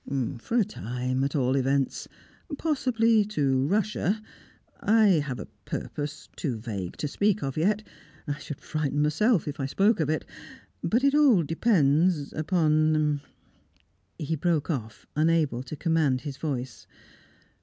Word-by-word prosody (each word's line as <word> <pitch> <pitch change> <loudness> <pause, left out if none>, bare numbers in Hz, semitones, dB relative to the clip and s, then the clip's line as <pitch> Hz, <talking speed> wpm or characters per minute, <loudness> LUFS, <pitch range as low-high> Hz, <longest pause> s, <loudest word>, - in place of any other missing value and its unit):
"For 230 - -2
a 225 - +4
time, 125 - -3
at 140 +3 -1
all 130 -2 +2
events. 135 0 0 0.5
Possibly 230 -8 +2
to 140 -9 +1
Russia 210 +2 0 0.6
I 220 +1 +4
have 140 -4 -3
a - - -5 0.2
purpose 145 -1 -5
too 130 -8 -2
vague 105 -6 -5
to 150 - -2
speak 205 +6 +1
of 135 -1 -3
yet 210 +7 +1 0.4
I 145 0 -3
should 150 - -7
frighten 150 -1 -1
myself 190 +6 +2
if 150 +1 -5
I 135 - -1
spoke 200 +9 +2
of 155 -2 0
it. 155 - -1 0.6
But 235 +4 +1
it 280 0 +4
all 275 - +5
depends 160 -3 +2
upon 155 -2 +2 0.5
" - - -40
He 155 +2 -2
broke 165 0 0
off, 110 -7 -5
unable 155 -5 +2
to 130 +4 -7
command 155 -6 +1
his 140 -3 -6
voice. 130 -5 -4
155 Hz, 145 wpm, -27 LUFS, 135-195 Hz, 0.6 s, all